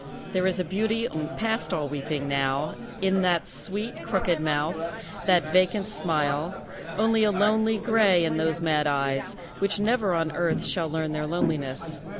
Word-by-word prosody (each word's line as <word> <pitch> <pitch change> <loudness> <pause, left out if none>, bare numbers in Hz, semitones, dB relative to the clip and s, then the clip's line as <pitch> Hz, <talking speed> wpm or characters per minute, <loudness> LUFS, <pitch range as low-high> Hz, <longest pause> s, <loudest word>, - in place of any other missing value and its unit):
There 185 0 +2
is 185 0 0
a - - +1
beauty 220 +6 0 0.3
past 225 -1 0
all 150 -3 -2
weeping 145 0 -3
now 140 +1 0 0.3
In 190 0 +3
that 175 -2 +2
sweet, 210 +3 -2
crooked 180 -5 0
mouth, 155 +1 0 0.5
that 170 -4 +3
vacant 185 +2 +3
smile; 160 -3 -1 0.3
Only 220 +1 +3
a 215 - +4
lonely 215 +3 +2
grey 210 -6 +4
in 155 -1 0
those 160 +1 0
mad 155 -2 +2
eyes, 140 -1 -1 0.2
Which 200 +1 0
never 210 -3 +2
on 165 -1 0
earth 170 +1 0
shall 165 -4 -1
learn 160 0 -2
their 150 0 -2
loneliness. 160 -1 -2
175 Hz, 155 wpm, -26 LUFS, 155-205 Hz, 0.5 s, a